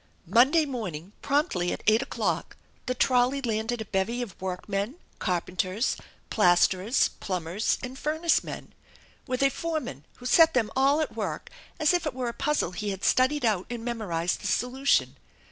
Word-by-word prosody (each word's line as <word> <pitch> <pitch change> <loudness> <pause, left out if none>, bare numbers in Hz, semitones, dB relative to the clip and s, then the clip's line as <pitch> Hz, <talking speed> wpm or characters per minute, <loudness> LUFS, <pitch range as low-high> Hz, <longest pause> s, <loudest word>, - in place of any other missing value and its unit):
Monday 280 +7 +5
morning 200 - -5
promptly 275 - +1
at - - -5
eight 220 +2 +5
o'clock - - -2 0.3
the 255 - 0
trolley, 255 +2 +3
landed 225 -1 -2
a - - -4
bevy 215 +5 -1
of 200 -7 -9
workmen, 195 +5 -3 0.2
carpenters, 185 +4 -1 0.4
plasterers, 185 +3 +3
plumbers, 185 +2 -1
and 255 +1 -6
furnace 315 +2 +1
men, - - -8 0.5
with 255 +1 0
a 275 - +4
foreman 310 - -4
who 250 - -14
set 325 +5 +5
them 225 -4 +1
all 275 +3 +3
at 310 - -3
work - - -4 0.3
as 310 +1 +4
if 350 -3 +1
it 275 - -4
were 250 -2 -2
a - - -5
puzzle 295 - 0
he 205 +3 -4
had 195 -1 -5
studied 260 +1 +3
out 205 -5 +1
and 235 -1 -5
memorized 180 -8 -2
the - - -3
solution. 245 - +1
235 Hz, 160 wpm, -27 LUFS, 190-275 Hz, 0.5 s, Monday